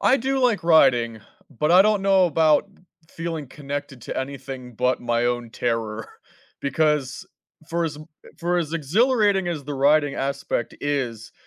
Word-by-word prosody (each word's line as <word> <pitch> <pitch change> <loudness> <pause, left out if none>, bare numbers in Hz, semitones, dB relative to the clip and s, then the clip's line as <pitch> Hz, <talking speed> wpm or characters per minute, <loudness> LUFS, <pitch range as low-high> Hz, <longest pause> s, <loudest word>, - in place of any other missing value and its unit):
I 260 - +5
do 270 +3 -1
like 235 -8 +2
riding, 125 -9 +4 0.3
but, 150 +4 0
I 180 - +8
don't 210 -1 +2
know 195 -2 +4
about 160 +2 +3 0.4
feeling 165 -4 -5
connected 140 -3 -6
to - - -6
anything 130 -2 -7
but, 125 +3 0
my 120 0 0
own 120 -1 -1
terror, 110 -1 -3 0.5
because 140 -2 0 0.4
for 170 0 -1
as 150 -2 -4 0.4
for 175 +1 0
as 160 -2 -3
exhilarating 200 - +2
as 155 -5 -4
the 145 - -5
riding 145 +1 +3
aspect 140 -3 -3
is, 125 -6 -3
145 Hz, 145 wpm, -23 LUFS, 125-170 Hz, 0.5 s, I